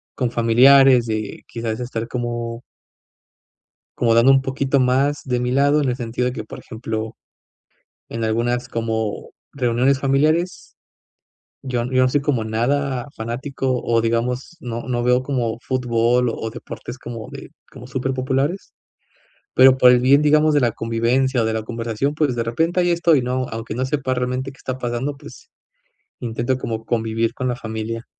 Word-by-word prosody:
con 125 Hz, -3 st, -1 dB
familiares, 125 Hz, +2 st, +6 dB
eh, 110 Hz, 0 st, 0 dB, 0.2 s
y -, -, -26 dB
quizás 115 Hz, -2 st, -5 dB
estar 115 Hz, -2 st, -4 dB
como 120 Hz, -1 st, -4 dB, 1.4 s
como 115 Hz, -2 st, +3 dB
dando 115 Hz, +4 st, +6 dB
un 135 Hz, 0 st, +5 dB
poquito 135 Hz, +1 st, 0 dB
más 135 Hz, +3 st, +1 dB
de 125 Hz, -2 st, -1 dB
mi 125 Hz, 0 st, -1 dB
lado 140 Hz, +3 st, +3 dB
en 140 Hz, -, 0 dB
el 125 Hz, -, -1 dB
sentido 125 Hz, 0 st, -3 dB
de 125 Hz, -, -2 dB
que 110 Hz, -, -5 dB
por -, -, -10 dB
ejemplo, 110 Hz, 0 st, -5 dB, 0.9 s
en 115 Hz, 0 st, -4 dB
algunas 120 Hz, +3 st, 0 dB
como 110 Hz, -3 st, -3 dB, 0.2 s
reuniones 130 Hz, +1 st, +1 dB
familiares, 155 Hz, +6 st, 0 dB, 0.9 s
yo 125 Hz, -3 st, -2 dB
yo 130 Hz, 0 st, +3 dB
no 130 Hz, -, +4 dB
soy 145 Hz, +3 st, +1 dB
como 135 Hz, -6 st, 0 dB
nada 125 Hz, +3 st, -1 dB
fanático, 130 Hz, +2 st, -2 dB
o 115 Hz, -1 st, +2 dB
digamos 120 Hz, +7 st, -1 dB
no 120 Hz, -4 st, -5 dB
no 120 Hz, -1 st, -1 dB
veo 125 Hz, +1 st, +3 dB
como 120 Hz, -4 st, -2 dB
fútbol 125 Hz, -1 st, +1 dB
o 110 Hz, -, -5 dB
deportes 120 Hz, +1 st, -8 dB
como 115 Hz, -3 st, -8 dB
de, -, -, -9 dB, 0.2 s
como -, -, -11 dB
súper 130 Hz, 0 st, -2 dB
populares, 135 Hz, +7 st, -1 dB, 0.8 s
pero 130 Hz, 0 st, +7 dB
por 125 Hz, -1 st, +7 dB
el 125 Hz, -, +5 dB
bien 135 Hz, +4 st, +5 dB
digamos 150 Hz, +1 st, +4 dB
de 145 Hz, -, +3 dB
la 120 Hz, -2 st, +2 dB
convivencia 120 Hz, +4 st, 0 dB
o -, -, +1 dB
de 110 Hz, -, 0 dB
la 110 Hz, 0 st, -2 dB
conversación 115 Hz, +4 st, -2 dB
pues 150 Hz, -5 st, +1 dB
de 115 Hz, -, -1 dB
repente 165 Hz, +10 st, 0 dB
ahí 175 Hz, -1 st, +2 dB
estoy, 170 Hz, -4 st, +3 dB
¿no? 130 Hz, +1 st, -1 dB
Aunque 115 Hz, -1 st, -5 dB
no 130 Hz, +2 st, -1 dB
sepa 130 Hz, -1 st, -1 dB
realmente 125 Hz, +1 st, -2 dB
que -, -, -21 dB
está 130 Hz, 0 st, -5 dB
pasando 125 Hz, +3 st, -3 dB
pues, 150 Hz, -, -14 dB, 0.7 s
intento 120 Hz, +2 st, -2 dB
como 115 Hz, -3 st, -4 dB
convivir 115 Hz, 0 st, -1 dB
con 130 Hz, -2 st, -3 dB
la 125 Hz, -, -1 dB
familia. 110 Hz, 0 st, -5 dB
125 Hz, 170 wpm, -21 LUFS, 115-135 Hz, 1.4 s, pero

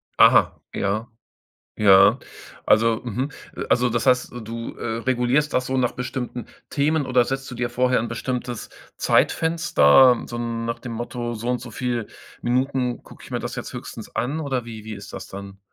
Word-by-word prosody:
Aha, -, -, +5 dB
ja. 105 Hz, +4 st, -1 dB, 0.7 s
Ja. 100 Hz, -2 st, +6 dB, 0.5 s
Also, 115 Hz, +1 st, +4 dB
mhm. 125 Hz, +4 st, -2 dB, 0.3 s
Äh, -, -, -3 dB
also 125 Hz, 0 st, +3 dB
das 120 Hz, +3 st, -1 dB
heißt, 125 Hz, -1 st, +3 dB
du, 115 Hz, +1 st, -6 dB
äh, 115 Hz, -1 st, -3 dB
regulierst 130 Hz, +4 st, +1 dB
das 125 Hz, 0 st, +1 dB
so 130 Hz, -, -1 dB
nach 125 Hz, -2 st, +1 dB
bestimmten 125 Hz, -1 st, -5 dB, 0.2 s
Themen 150 Hz, +1 st, +1 dB
oder 125 Hz, -1 st, +3 dB
setzt 135 Hz, +1 st, -4 dB
du -, -, -6 dB
dir 120 Hz, 0 st, -1 dB
vorher 125 Hz, +1 st, +2 dB
'n 115 Hz, -, -2 dB
bestimmtes 120 Hz, 0 st, -4 dB, 0.3 s
Zeitfenster, 160 Hz, -, +4 dB
so 120 Hz, -, -6 dB
nach 115 Hz, 0 st, -3 dB
dem 120 Hz, -, -7 dB
Motto: 120 Hz, +1 st, -4 dB
„So 115 Hz, +2 st, -5 dB
und 125 Hz, 0 st, 0 dB
so 120 Hz, -, -9 dB
viel 120 Hz, -3 st, -2 dB, 0.4 s
Minuten 125 Hz, 0 st, 0 dB
gucke -, -, -15 dB
ich -, -, -13 dB
mir -, -, -1 dB
das -, -, -5 dB
jetzt -, -, -6 dB
höchstens -, -, -8 dB
an“ 135 Hz, +6 st, -1 dB
oder 135 Hz, -5 st, -2 dB
wie 110 Hz, -2 st, -9 dB
wie 110 Hz, 0 st, -6 dB
ist -, -, -10 dB
das -, -, -7 dB
dann? 100 Hz, 0 st, -9 dB
120 Hz, 180 wpm, -23 LUFS, 115-130 Hz, 0.7 s, Ja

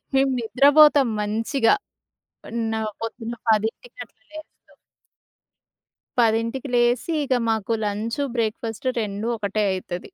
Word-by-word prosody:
మేము 270 Hz, 0 st, +3 dB
నిద్రబోతం 285 Hz, +3 st, +5 dB
మంచిగా, 225 Hz, +4 st, +1 dB, 0.7 s
పన్న 225 Hz, -1 st, -3 dB, 0.3 s
పొద్దున్న 225 Hz, +1 st, -5 dB
10కి 220 Hz, -, 0 dB
అట్లా -, -, -35 dB
లేస్తాం. 310 Hz, 0 st, -14 dB, 1.5 s
10కి 230 Hz, +4 st, 0 dB
లేసి 240 Hz, +6 st, +2 dB
ఇగ 260 Hz, -2 st, 0 dB
మాకు 225 Hz, 0 st, 0 dB
లంచు, 215 Hz, +6 st, -2 dB
బ్రేక్‌ఫాస్టు 225 Hz, +2 st, -2 dB
2 205 Hz, +2 st, -4 dB
ఒకటే 210 Hz, 0 st, -1 dB
అయితది. 180 Hz, -1 st, -5 dB
230 Hz, 100 wpm, -23 LUFS, 220-260 Hz, 1.5 s, నిద్రబోతం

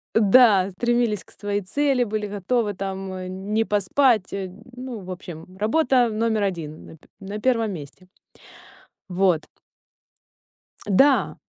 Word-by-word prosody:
Да, 210 Hz, -3 st, +5 dB
стремились 240 Hz, 0 st, 0 dB
к -, -, -22 dB
своей 205 Hz, 0 st, -3 dB
цели, 265 Hz, +5 st, +1 dB
были 215 Hz, -1 st, -3 dB
готовы 205 Hz, +2 st, -1 dB
там 190 Hz, 0 st, -5 dB
не 225 Hz, +1 st, +2 dB
поспать. 210 Hz, +2 st, +2 dB
Ну, 220 Hz, +6 st, -7 dB
в 185 Hz, -1 st, -9 dB
общем, 180 Hz, 0 st, -9 dB
работа 245 Hz, +2 st, +3 dB
номер 220 Hz, -1 st, 0 dB
1 165 Hz, -5 st, -5 dB
на 160 Hz, -, -12 dB, 0.2 s
на 200 Hz, +2 st, -6 dB
1 230 Hz, -3 st, +1 dB
месте. 175 Hz, +3 st, -10 dB, 1.0 s
Вот. 180 Hz, -3 st, +1 dB, 1.4 s
Да! 265 Hz, +8 st, +3 dB
205 Hz, 115 wpm, -23 LUFS, 185-235 Hz, 1.4 s, Да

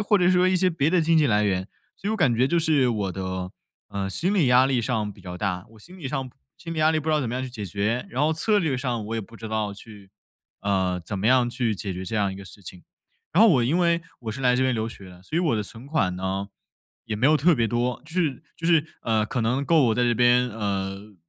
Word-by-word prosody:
或 210 Hz, -, +4 dB
者 180 Hz, -1 st, +3 dB
说 180 Hz, 0 st, +4 dB
一 185 Hz, -, +2 dB
些 185 Hz, 0 st, +3 dB
别 155 Hz, -2 st, +1 dB
的 180 Hz, 0 st, +3 dB
经 165 Hz, 0 st, +3 dB
济 150 Hz, -, +4 dB
来 105 Hz, -3 st, +2 dB
源。 95 Hz, -2 st, 0 dB, 0.3 s
其 -, -, -28 dB
实 -, -, +1 dB
我 220 Hz, -, 0 dB
感 140 Hz, -, +3 dB
觉 125 Hz, +3 st, +3 dB
就 170 Hz, +3 st, +1 dB
是 150 Hz, -6 st, +3 dB
我 100 Hz, -5 st, -1 dB
的， 95 Hz, -1 st, -4 dB, 0.4 s
呃， 100 Hz, -1 st, -3 dB
心 175 Hz, -, -1 dB
理 175 Hz, -9 st, +3 dB
压 125 Hz, +1 st, +6 dB
力 130 Hz, -3 st, +1 dB
上 110 Hz, -3 st, -2 dB
比 -, -, -17 dB
较 90 Hz, -1 st, -7 dB
大， 90 Hz, -2 st, -3 dB
我 110 Hz, -, -17 dB
心 180 Hz, -, -14 dB
理 145 Hz, -, -6 dB
上 135 Hz, -2 st, -3 dB, 0.3 s
心 165 Hz, -1 st, -7 dB
理 160 Hz, -, -4 dB
压 155 Hz, +1 st, +4 dB
力 155 Hz, -, +1 dB
不 155 Hz, -, -5 dB
知 -, -, +3 dB
道 150 Hz, -, +2 dB
怎 125 Hz, -, -2 dB
么 120 Hz, -, -3 dB
样 130 Hz, -, -2 dB
去 130 Hz, -, -5 dB
解 105 Hz, -5 st, -6 dB
决， 105 Hz, +6 st, -1 dB
然 130 Hz, +4 st, -2 dB
后 155 Hz, +1 st, +3 dB
策 205 Hz, +6 st, +2 dB
略 155 Hz, -8 st, 0 dB
上， 120 Hz, -4 st, -2 dB
我 115 Hz, -, -4 dB
也 -, -, -1 dB
不 115 Hz, +3 st, -13 dB
知 110 Hz, 0 st, -7 dB
道 110 Hz, -2 st, -2 dB
去， 100 Hz, -2 st, -13 dB, 0.5 s
呃， 95 Hz, -3 st, 0 dB
怎 95 Hz, +4 st, -5 dB
么 105 Hz, -, -1 dB
样 125 Hz, -1 st, +4 dB
去 120 Hz, -3 st, -1 dB
解 95 Hz, 0 st, -4 dB
决 90 Hz, +1 st, -6 dB
这 95 Hz, -, -5 dB
样 100 Hz, -3 st, +1 dB
一 -, -, -8 dB
个 100 Hz, -, -9 dB
事 100 Hz, +1 st, -13 dB
情。 90 Hz, 0 st, -10 dB, 0.5 s
然 195 Hz, +7 st, +5 dB
后 225 Hz, -, +8 dB
我 130 Hz, -9 st, +4 dB
因 150 Hz, +9 st, +1 dB
为， 170 Hz, -1 st, +2 dB, 0.2 s
我 110 Hz, -3 st, -5 dB
是 135 Hz, -, -7 dB
来 125 Hz, -1 st, +3 dB
这 130 Hz, -, +2 dB
边 130 Hz, -1 st, +2 dB
留 110 Hz, -1 st, -2 dB
学 100 Hz, -4 st, -11 dB
的， 90 Hz, 0 st, -14 dB
所 155 Hz, -, -5 dB
以 -, -, +3 dB
我 155 Hz, -10 st, +1 dB
的 105 Hz, -, -1 dB
存 115 Hz, +5 st, -11 dB
款 140 Hz, -, 0 dB
呢， 95 Hz, +2 st, -3 dB, 0.6 s
也 110 Hz, -2 st, -3 dB
没 125 Hz, +6 st, +2 dB
有 155 Hz, +1 st, +5 dB
特 165 Hz, +3 st, +4 dB
别 115 Hz, -3 st, +1 dB
多， 120 Hz, +2 st, -1 dB
就 160 Hz, -, -11 dB
是 155 Hz, -7 st, -1 dB
就 165 Hz, -, -10 dB
是， 165 Hz, -3 st, +4 dB, 0.2 s
呃， 110 Hz, -2 st, +1 dB
可 125 Hz, -, -2 dB
能 125 Hz, +5 st, 0 dB
够 160 Hz, -2 st, +4 dB
我 110 Hz, -, +2 dB
在 125 Hz, -, +1 dB
这 120 Hz, -, +2 dB
边， 125 Hz, +1 st, +4 dB
呃， 100 Hz, -1 st, -4 dB
120 Hz, 305 characters per minute, -25 LUFS, 100-155 Hz, 0.6 s, 后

